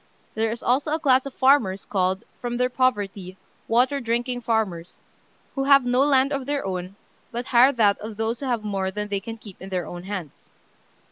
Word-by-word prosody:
There 225 0 0
is 230 +2 -5
also 275 +5 +1
a - - -3
class 265 -3 +3
of 275 - -8
farmers 250 -8 +3
called, 190 -1 0 0.2
from 240 0 -3
their 250 +1 +1
poverty, 205 -7 -1 0.3
"water 250 +5 +2
drinking 240 +1 -2
farmers," 215 -7 -2 0.5
who 270 -1 -2
have 275 -2 +6
no 245 +1 +2
land 275 -1 +3
of 275 -1 -3
their 285 -4 -1
own, 185 0 -4 0.4
but 240 +1 -4
hire 255 +2 +5
that 210 -5 +3
of 215 0 -8
those 225 +1 -1
who 275 - -4
have 235 -4 -1
more 195 -2 -2
than 210 +2 -4
they 200 -1 -1
can 225 +3 -8
keep 205 -4 -13
in 190 - -8
their 180 -3 -2
own 175 +2 -8
hands. 190 -7 -7
230 Hz, 200 wpm, -24 LUFS, 195-255 Hz, 0.5 s, have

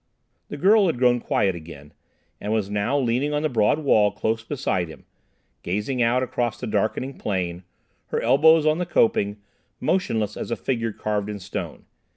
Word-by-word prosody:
The 145 - -6
girl 200 +5 +5
had 165 - 0
grown 125 -1 +3
quiet 100 -4 +1
again, 80 -4 -11 0.5
and 105 - -4
was 105 -3 -1
now 105 +7 0
leaning 135 +3 0
on 150 - -1
the 155 - +1
broad 110 0 +2
wall 110 -9 +3
close 110 +2 -2
beside 115 - -2
him, 80 - -13 0.6
gazing 105 +8 -2
out 120 +2 +2
across 120 -2 -2
the - - -5
darkening 110 +6 -2
plain, 90 -3 -2 0.5
her - - -1
elbows 160 +2 +5
on 155 +2 +2
the 180 - -2
coping, 105 -8 +2 0.4
motionless 110 - 0
as - - -5
a 115 - 0
figure 115 -3 -2
carved 105 -1 -2
in 105 - -4
stone. 95 -3 -6
115 Hz, 175 wpm, -24 LUFS, 100-135 Hz, 0.6 s, girl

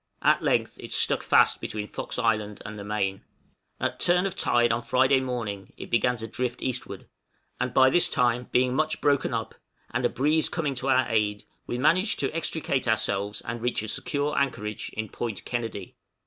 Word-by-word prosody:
At - - +4
length - - 0
it - - -9
stuck - - +2
fast - - +4
between 105 -1 -4
Fox - - -5
Island 105 -4 0
and 105 -1 -7
the - - -6
main. 100 -2 -2 0.6
At - - -2
turn 180 +2 +3
of 195 - -2
tide 120 -1 +3
on 115 - -1
Friday 130 +2 +3
morning 115 -7 -4
it - - -9
began 120 +1 +2
to 115 0 -6
drift 120 +2 -3
eastward, 130 -1 -4 0.5
and 125 - -1
by 130 +1 +5
this 175 +3 +4
time 125 0 +1
being 125 0 +3
much 155 +3 0
broken 145 -2 +2
up, 115 -2 -3 0.4
and 125 +2 -1
a 120 - +3
breeze 155 +4 +2
coming 150 -5 -1
to 130 +1 -3
our 130 -1 +4
aid, 105 -2 0 0.2
we 120 - -2
managed 180 - +3
to 140 +3 -1
extricate 155 -5 -1
ourselves 105 -2 0
and 115 0 -5
reach 120 -2 -1
a - - -5
secure 145 +5 -1
anchorage 105 -6 -2
in 110 0 -3
Point 110 0 -5
Kennedy. 115 -6 -4
120 Hz, 190 wpm, -26 LUFS, 110-135 Hz, 0.6 s, by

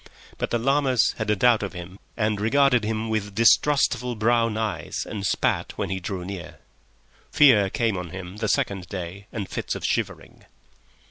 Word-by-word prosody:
But - - -2
the 120 - +1
llamas 130 -1 +2
had 110 -1 -2
a 105 - +3
doubt 120 +2 +4
of 100 -2 -4
him 90 +2 -9 0.2
and 105 -2 0
regarded 125 +1 +3
him 110 +1 -2
with 105 -2 -3
distrustful 125 0 +3
brown 115 0 +1
eyes 110 -2 -3
and 100 - -5
spat 95 - 0
when - - -3
he 95 - -2
drew 90 0 -5
near. 95 -2 -7 0.7
Fear 110 -9 +5
came 115 0 0
on 90 -2 -5
him 95 +1 -8
the 110 0 -2
second 95 -2 -1
day 95 +2 -7
and 105 -4 -4
fits - - -4
of - - -5
shivering. - - -3
105 Hz, 175 wpm, -24 LUFS, 95-115 Hz, 0.7 s, Fear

